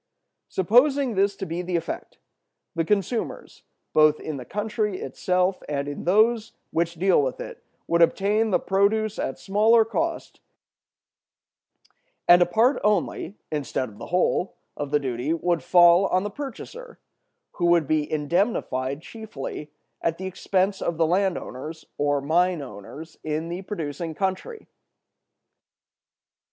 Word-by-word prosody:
Supposing 250 - +3
this 200 0 +2
to 195 - -5
be 170 0 -3
the 180 0 -3
effect, 165 0 -4 0.6
the 165 -2 0
consumers, 210 +5 -2 0.3
both 155 -1 +5
in 155 -2 -5
the 125 - -8
country 210 - -2
itself 185 +1 0
and 140 -1 -2
in 145 - -6
those 220 +4 +3 0.2
which 170 +1 -1
dealt 185 -3 +3
with 130 - -3
it, - - -8 0.2
would 170 0 +1
obtain 205 +6 +3
the 190 - +3
produce 205 +2 +1
at 135 - -2
smaller 215 +9 +4
cost; 325 +8 -3 1.9
and 175 0 +8
a 175 - +5
part 235 +9 +2
only, 205 -2 0 0.2
instead 140 -4 -2
of 105 - -16
the - - -7
whole, 180 +1 +1 0.2
of 145 - -4
the 150 +1 +2
duty 130 +2 -2
would 170 -1 0
fall 175 +5 +6
on 185 +1 +1
the 205 - -4
purchaser, 295 - -8 0.5
who 175 - -1
would 170 -2 +4
be 155 -1 0
indemnified 150 - -1
chiefly 160 -9 -7 0.3
at 165 0 0
the 190 - -6
expense 190 +1 0
of 170 - -2
the 165 - +3
land 185 +3 +1
owners 155 +5 -8
or 145 -1 +1
mine 170 +2 +1
owners 135 +8 -10
in 155 +2 -3
the 175 +2 -4
producing 165 -4 -5
country. 190 - -3
175 Hz, 140 wpm, -25 LUFS, 155-205 Hz, 1.9 s, and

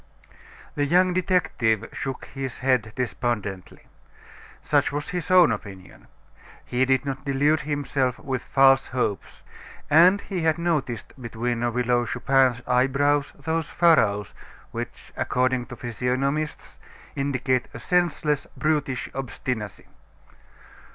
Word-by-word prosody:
The 145 - 0
young 180 +3 +3
detective 125 - +1
shook 135 -2 -5
his 135 -2 -5
head 125 -4 +1
despondently. 115 -6 -3 0.7
Such - - +1
was 145 +1 -4
his 180 -1 -4
own 180 -2 +6
opinion. 95 -3 -8 0.6
He 125 +1 +1
did 130 0 +1
not 135 -1 -4
delude 145 +3 +2
himself 140 -4 -1
with 130 -2 -4
false 135 0 +4
hopes, 125 -6 -3 0.5
and 175 +6 +6
he 185 -4 -4
had 160 0 +2
noticed 150 - -2
between 120 0 -3
the 120 0 0
Widow 120 0 +1
Chupin's 130 -2 +2
eyebrows 140 +3 +2
those 160 +2 -2
furrows 105 - +3 0.4
which, - - -7
according 125 -1 0
to 120 - -8
physiognomists, 130 +6 -3 0.4
indicate 130 -2 0
a - - -9
senseless, 160 -5 0
brutish 150 -4 -1
obstinacy. 125 -6 -5
135 Hz, 115 wpm, -24 LUFS, 120-150 Hz, 0.7 s, own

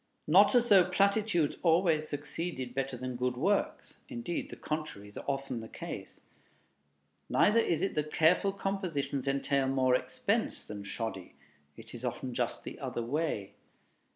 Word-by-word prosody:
Not 195 +9 +6
as 240 -1 +4
though 190 -4 +7
platitudes 200 -4 +2
always 165 -2 +3
succeeded 145 -3 -4
better 135 -1 -2
than 130 0 -4
good 125 0 -1
works; 195 +10 0
indeed, 235 -10 -4
the - - -7
contrary 150 -10 -5
is 105 - -8
often 135 -3 -2
the 110 - -8
case. - - -8 1.1
Neither 215 +3 +4
is 170 -6 +1
it 195 - 0
that 150 0 -2
careful 180 +5 +4
compositions 180 -9 -2
entail 140 0 +1
more 130 -1 +2
expense 125 - 0
than 105 -1 -7
"shoddy." 100 -3 -5 0.4
It - - -12
is 120 0 -8
often 125 0 -3
just - - -2
the - - -8
other 120 - -3
way. 130 -6 -2
150 Hz, 150 wpm, -31 LUFS, 125-180 Hz, 1.1 s, though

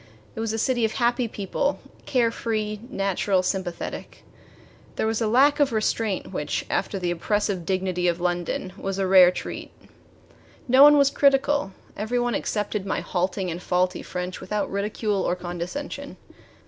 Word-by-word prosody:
It - - -8
was 225 -1 -1
a 225 - -2
city 240 +1 +1
of 220 - +1
happy 240 0 +1
people 215 +7 -2 0.3
care 240 -4 +2
free, 215 -2 -2
natural, 195 -3 0
sympathetic. 185 -2 -4 0.7
There - - -1
was 225 +1 0
a 225 - +2
lack 275 +6 +4
of 285 -3 +3
restraint 215 -2 -1
which, - - -2
after 200 - -1
the 175 -2 -1
oppressive 190 0 -1
dignity 185 -2 0
of 170 0 +1
London, 175 +1 -2
was 195 -1 -3
a 195 - 0
rare 185 -1 +8
treat. 180 - -6 1.0
No 260 +2 +5
one 295 +1 +9
was 280 -1 +4
critical. 280 -6 +2 0.2
Every 220 +4 -2
one 240 0 0
accepted 210 -1 -2
my 195 - -2
halting 185 0 -2
and 170 +2 -5
faulty 180 +1 0
French 180 0 -5
without 210 +2 -2
ridicule 205 0 -1
or 180 - 0
condescension. 180 +11 -6
205 Hz, 160 wpm, -24 LUFS, 185-235 Hz, 1.0 s, one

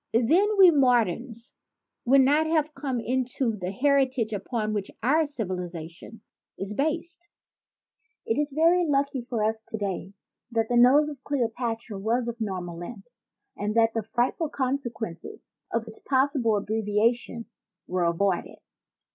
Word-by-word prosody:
Then 345 - +3
we 375 -3 +9
moderns 240 - +1 0.5
would 270 +3 +6
not 295 +4 +3
have 310 -1 +1
come 270 -3 -3
into 250 -1 -1
the 180 -3 -4
heritage 260 0 +1
upon 215 +1 -2
which 205 -2 -3
our 305 +5 +3
civilization 180 - -6 0.4
is 195 +2 -4
based. 335 - -3 1.0
It 225 - 0
is 295 -1 -1
very 335 +5 +4
lucky 280 -4 0
for 235 -3 -3
us 220 +1 0
today 200 -3 -5 0.4
that 225 -2 -1
the 245 - +1
nose 260 +5 +6
of 275 -3 -10
Cleopatra 235 -5 -2
was 235 +4 0
of 235 0 -4
a - - +2
normal 180 -4 -5
length 195 +5 -9 0.5
and 210 +1 -3
that 225 -1 +4
the 225 - -1
frightful 240 +8 -1
consequences 240 - -4 0.2
of 230 0 -2
its 220 - -10
possible 260 -5 +1
abbrevia 215 +2 +1
tion 235 -1 -9 0.4
were 180 -1 -1
avoided. 175 +2 0
235 Hz, 140 wpm, -26 LUFS, 215-275 Hz, 1.0 s, we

